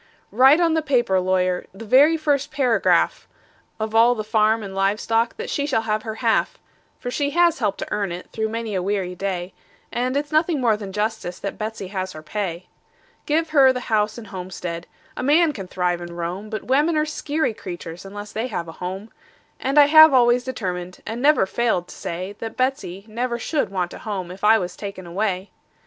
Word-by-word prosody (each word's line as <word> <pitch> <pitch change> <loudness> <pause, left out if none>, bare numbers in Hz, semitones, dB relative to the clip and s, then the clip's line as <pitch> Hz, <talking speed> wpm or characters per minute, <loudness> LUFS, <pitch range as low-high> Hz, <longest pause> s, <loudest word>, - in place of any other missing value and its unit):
Write 265 +7 +6
on 335 -2 +3
the 320 - +2
paper, 240 -10 +2
lawyer 185 -1 0
the 215 +4 -10
very 285 +8 +5
first 290 -3 0
paragraph 260 -6 +2 0.5
Of 220 0 -3
all 230 +2 +5
the 215 - -3
farm 220 0 +2
and 195 -1 -7
live 195 +2 +1
stock 230 +1 0
that 460 +2 -5
she 285 0 -1
shall 225 -6 +1
have 215 -1 -1
her 220 0 -5
half; - - +2 0.4
For 245 - -5
she 285 +2 0
has 345 -4 +4
helped 205 -4 0
to - - -5
earn 200 -3 -1
it, 175 +1 -7
through 220 0 -2
many 225 -1 -4
a 185 - 0
weary 190 -1 -1
day, 180 -1 -4 0.4
And 255 +3 -1
it's 290 +1 -3
nothing 310 0 +2
more 235 -4 +3
than 205 -2 -7
justice 210 -3 -2
that 200 - -6
Betsey 215 -3 -5
has 185 -1 -4
her 155 - -10
pay. 180 -1 -4 0.6
Give 320 +2 +1
her 275 -4 +6
the 255 - -3
house 215 0 +1
and 235 - -8
homestead 180 -3 -6 0.3
a - - -4
man 300 +4 +4
can 195 -7 -7
thrive 180 -1 -1
and 175 0 -8
roam; 180 +5 -4
But 215 -2 -4
women 295 +6 +2
are 305 - +2
skeery 305 -3 -1
critters, 175 -4 -8
unless 205 +1 -8
they 225 +3 -2
have 175 -8 -4
a - - -7
home; 190 +4 -5 0.5
And 270 +3 -1
I 290 - +9
have 310 -1 +8
always 245 0 +4
determined, 185 -8 -5
and 230 +2 -4
never 295 -7 +4
failed 190 -4 0
to - - -10
say, 185 +4 -5
That 225 -1 -6
Betsey 255 -8 -2
never 235 +2 -2
should 285 +3 -1
want 180 -3 -2
a - - -9
home 190 -5 -5
if 190 +2 -11
I 220 +2 +6
was 180 -4 -4
taken 200 -3 -7
away. 190 +2 -2
215 Hz, 205 wpm, -22 LUFS, 185-260 Hz, 0.6 s, I